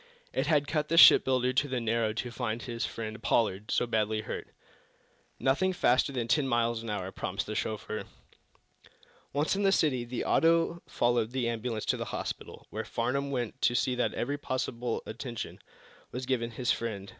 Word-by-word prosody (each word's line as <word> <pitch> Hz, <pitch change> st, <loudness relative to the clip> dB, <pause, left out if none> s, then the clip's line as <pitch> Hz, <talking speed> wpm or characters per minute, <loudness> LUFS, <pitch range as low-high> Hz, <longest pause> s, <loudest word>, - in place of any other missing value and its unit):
It -, -, 0 dB
had 145 Hz, -3 st, +3 dB
cut 150 Hz, 0 st, 0 dB
the 165 Hz, -, 0 dB
shipbuilder 130 Hz, -5 st, +7 dB
to 135 Hz, +3 st, +2 dB
the 130 Hz, -2 st, -1 dB
marrow 115 Hz, -1 st, +1 dB
to 120 Hz, +3 st, -4 dB
find 115 Hz, -1 st, -3 dB
his 115 Hz, +1 st, -3 dB
friend, 110 Hz, -1 st, -6 dB
Pollard, 105 Hz, -2 st, +1 dB
so -, -, +2 dB
badly 110 Hz, -2 st, 0 dB
hurt. -, -, -6 dB, 0.9 s
"Nothing 170 Hz, +8 st, +2 dB
faster 130 Hz, -4 st, +3 dB
than 120 Hz, -4 st, -2 dB
ten 140 Hz, +3 st, +2 dB
miles 120 Hz, -2 st, +1 dB
an 115 Hz, -, -6 dB
hour," 95 Hz, -3 st, -3 dB
promised -, -, -3 dB
the -, -, -5 dB
chauffeur. -, -, -3 dB, 1.3 s
Once 150 Hz, +6 st, +1 dB
in 200 Hz, -, -1 dB
the 195 Hz, -1 st, +4 dB
city 140 Hz, -10 st, +2 dB
the 120 Hz, 0 st, -4 dB
auto 165 Hz, +1 st, +3 dB
followed 120 Hz, -2 st, +1 dB
the 130 Hz, -3 st, 0 dB
ambulance 115 Hz, -1 st, -2 dB
to -, -, +1 dB
the -, -, -3 dB
hospital, -, -, -6 dB
where -, -, -3 dB
Farnum 140 Hz, +4 st, -1 dB
went 125 Hz, -5 st, -3 dB
to 120 Hz, -, +3 dB
see 130 Hz, -, +2 dB
that 125 Hz, -, 0 dB
every 145 Hz, +4 st, -2 dB
possible 125 Hz, -3 st, -2 dB
attention 115 Hz, +1 st, -6 dB, 0.5 s
was 125 Hz, +1 st, -4 dB
given 120 Hz, -2 st, 0 dB
his 125 Hz, +2 st, -1 dB
friend. 105 Hz, -4 st, -3 dB
120 Hz, 180 wpm, -30 LUFS, 115-135 Hz, 1.3 s, shipbuilder